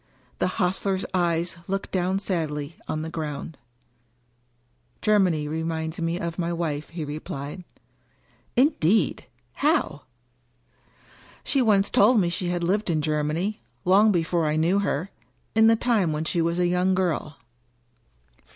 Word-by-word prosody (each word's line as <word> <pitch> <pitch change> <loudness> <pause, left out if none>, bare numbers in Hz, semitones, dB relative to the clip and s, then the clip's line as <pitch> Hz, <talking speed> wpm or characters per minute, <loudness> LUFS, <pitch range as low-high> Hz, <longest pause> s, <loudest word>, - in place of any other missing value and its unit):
The - - +2
hostler's 190 0 0
eyes 170 -1 0
looked 195 +1 -3
down 185 +1 0
sadly 160 -6 -3
on 155 0 -2
the 160 - -4
ground, 155 -1 -5 1.5
Germany 185 -8 +3
reminds 160 +1 -3
me 165 +1 -1
of 170 +1 -4
my 170 0 -1
wife," 155 -3 -3
he 165 -2 -5
replied. 145 +2 -6 0.9
"Indeed! 230 - +2 0.3
How?" 285 - +1 1.4
"She 275 - +1
once 205 -4 +3
told 220 +3 +5
me 175 -3 +2
she 180 +1 -2
had 175 0 -1
lived 200 +4 0
in 155 -3 +1
Germany 155 +7 -1
— - - -41
^long 200 +4 +5
before 170 -2 +1
I 150 - +1
knew 170 +5 +2
her 190 -2 -1 0.2
— - - -42
in 220 0 +5
the 225 - +6
time 220 -8 +1
when 155 +1 -2
she 170 - 0
was 170 +1 0
a 180 - +2
young 180 +1 +2
girl." 165 -5 -1
175 Hz, 140 wpm, -25 LUFS, 160-195 Hz, 1.5 s, the